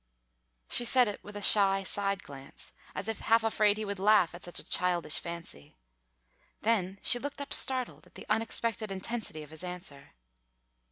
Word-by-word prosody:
She - - +4
said 250 0 +4
it 205 - -6
with 205 0 -9
a 205 - -5
shy 195 -2 +6
side 200 0 0
glance 135 -1 -11 0.2
as 200 - -4
if 225 - -3
half 225 0 +2
afraid 215 -2 +2
he 215 - -3
would 200 -1 -5
laugh 205 -3 +4
at 175 - -11
such 175 - -4
a - - -3
childish 175 -4 +1
fancy. 170 - -9 0.9
Then 200 -4 0
she 245 - +5
looked 285 +3 -6
up 280 -1 -5
startled, 255 -2 0
at - - -26
the - - -10
unexpected 225 0 -1
intensity 195 -4 -5
of 150 - -15
his 160 +2 -10
answer. 180 - -9
200 Hz, 175 wpm, -30 LUFS, 180-225 Hz, 0.9 s, shy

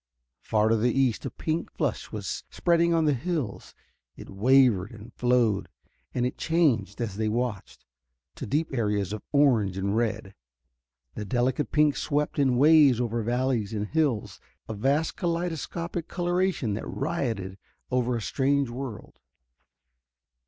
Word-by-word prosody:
Far 110 0 +1
to 115 - +3
the 120 +3 +2
east 130 -4 +1
a - - -3
pink 160 +1 -3
flush - - -3
was - - -4
spreading 170 -1 +2
on 165 -1 +2
the 150 - +3
hills. 135 - -4 0.4
It - - -10
wavered 110 -2 +4
and 115 0 -12
flowed, 120 -5 +1 0.4
and 125 -1 -1
it 125 - -4
changed, 130 - +1
as 105 -5 -3
they 110 0 0
watched, 115 -3 -3 0.5
to - - -7
deep 150 +5 -1
areas 105 -5 0
of 105 - -5
orange 120 -10 +3
and 100 +2 -1
red. 110 -3 -1 0.8
The 105 - -5
delicate 125 +6 0
pink 150 -1 +3
swept 150 0 -1
in 130 -3 +3
waves 145 -3 +6
over 120 -1 -1
valleys 120 -2 -1
and 105 0 -1
hills, 150 -9 0 0.3
a 110 - -4
vast 135 +9 0
kaleidoscopic 170 0 -3
coloration 175 - 0
that 105 - -5
rioted 115 - -3 0.3
over 125 -1 +1
a 115 - -3
strange 140 0 +1
world. 125 -3 -7
125 Hz, 145 wpm, -27 LUFS, 110-150 Hz, 0.8 s, waves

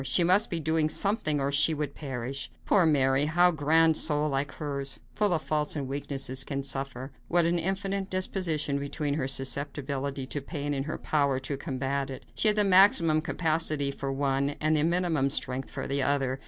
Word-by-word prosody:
She 135 +6 +1
must 185 +5 +4
be 170 - -2
doing 160 0 0
something 155 -6 +1
or 140 +1 -1
she 155 +3 +4
would 145 -1 -4
perish. 130 -3 -5 0.2
Poor 185 -5 +3
Mary! 135 -1 +2
How 175 +3 +4
a - - -2
grand 160 +1 +3
soul 150 -1 +1
like 140 0 -2
hers, 140 -3 -5
full 210 -2 +1
of 160 -3 0
faults 150 -1 -1
and 140 -3 -3
weakness, 135 -1 -2
can 140 -1 -4
suffer! 135 -1 -4 0.2
What 175 -1 +2
an 170 +1 +1
infinite 195 +2 -2
disproportion 165 -6 -1
between 140 +1 -3
her 140 -3 -2
susceptibility 140 0 -2
to 145 +2 -4
pain 145 0 -4
and 135 +1 -3
her 155 - -4
power 140 -3 0
to 135 +2 -3
combat 135 0 -3
it! 130 - -8
She - - +1
had 210 0 +5
the 210 - +5
maximum 185 -5 +5
capacity 155 -4 0
for 135 0 -5
one 140 +1 -1
and 155 +1 +1
the 150 - +2
minimum 165 -5 +1
strength 130 -1 -1
for - - -6
the 140 0 -1
other. 135 -1 0
145 Hz, 195 wpm, -27 LUFS, 135-165 Hz, 0.2 s, had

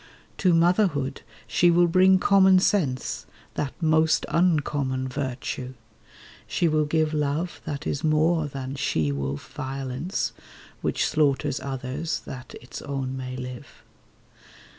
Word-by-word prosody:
To 185 - +4
motherhood 165 -5 +2 0.2
she 175 - +3
will 175 +1 +5
bring 185 +2 +5
common 190 -1 +5
sense— 160 -9 0 0.3
That 140 - -3
most 160 -1 +3
uncommon 145 -6 +1
virtue. 130 -1 -4 0.7
She 170 - +1
will 155 -1 +2
give 155 +1 +1
Love 150 +4 -1
that 145 -1 -4
is 145 - -2
more 155 +1 +2
than 135 -1 -5
she 80 - 0
wolf 70 0 -4
violence 135 +5 -3 0.5
(Which - - 0
slaughters 145 -2 +1
others 135 +4 -3
that 130 -1 -9
its 125 - -9
own 135 -2 -3
may 130 -1 -5
live). 125 0 -9
145 Hz, 120 wpm, -25 LUFS, 130-165 Hz, 0.7 s, will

